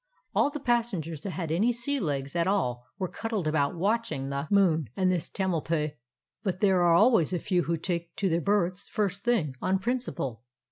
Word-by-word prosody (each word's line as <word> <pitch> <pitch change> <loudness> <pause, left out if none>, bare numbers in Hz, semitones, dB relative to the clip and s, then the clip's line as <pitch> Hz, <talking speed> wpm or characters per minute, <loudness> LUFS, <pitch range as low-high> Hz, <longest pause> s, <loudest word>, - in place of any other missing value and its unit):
All - - +3
the 295 - -5
passengers 225 - -1
that 195 - -4
had 165 -2 -4
any 205 +9 +3
sea 245 +4 -1
legs 140 - -2
at 170 0 +2
all 125 -12 0
were 190 -2 -1
cuddled 220 -4 -3
about 150 -1 +1
watching 200 -8 0
the 140 +2 -3
moon 170 - +3
and 185 -1 +3
this 175 -3 -1
old - - -32
Tamalpais, 165 -5 0 0.5
but 190 -4 -2
there 190 -3 +4
are 170 -1 +5
always 205 - +4
a - - +2
few 180 +1 +1
who 170 0 0
take 170 0 -3
to 200 -3 0
their 170 -1 +1
berths 195 0 0
first 200 -1 -1
thing, 215 - +1
on 190 +1 +2
principle. 190 - -3
185 Hz, 195 wpm, -28 LUFS, 160-205 Hz, 0.5 s, are